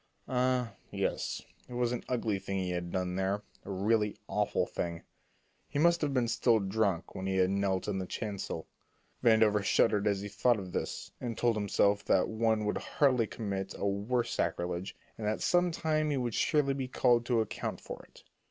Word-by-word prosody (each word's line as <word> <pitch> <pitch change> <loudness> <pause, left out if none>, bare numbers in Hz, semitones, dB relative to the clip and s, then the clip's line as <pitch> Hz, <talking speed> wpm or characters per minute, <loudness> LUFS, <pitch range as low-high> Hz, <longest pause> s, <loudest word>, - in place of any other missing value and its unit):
Ah, 125 -2 +1 0.2
yes; - - -2 0.3
it 125 - -7
was 120 -1 +1
an 125 - -3
ugly 110 -5 0
thing 95 0 -3
he 90 -1 -1
had 85 -1 -3
done 90 -1 -1
there, 95 +2 0 0.2
a - - -10
really 105 +2 +1
awful - - +1
thing. 85 -1 -4 0.7
He 145 - -3
must 170 +3 +4
have 150 -2 +1
been 125 -3 +1
still 115 0 +3
drunk 100 -3 0
when 95 - -4
he 95 - 0
had 95 0 +3
knelt 100 -1 0
in 100 -2 -1
the 95 - -4
chancel. 100 -6 -4 0.6
Vandover 110 -3 +5
shuddered 105 0 +3
as 100 -1 +1
he 100 - -4
thought 115 +4 +2
of 95 -3 -6
this, - - -4
and 120 -3 -3
told 120 -2 +2
himself 100 -1 +2
that 95 - +3
one 110 -1 +1
could 105 - 0
hardly 130 -6 +2
commit 100 -4 -4
a - - -2
worse 105 +5 0
sacrilege, 90 +1 -2 0.2
and 105 - -2
that 110 - 0
some 175 0 +3
time 155 -2 0
he 145 - 0
would 120 -3 -1
surely 145 0 +2
be 135 -1 -3
called 120 -2 +3
to 120 -2 +3
account 110 - -3
for - - -8
it. - - -19
110 Hz, 190 wpm, -31 LUFS, 95-125 Hz, 0.7 s, Vandover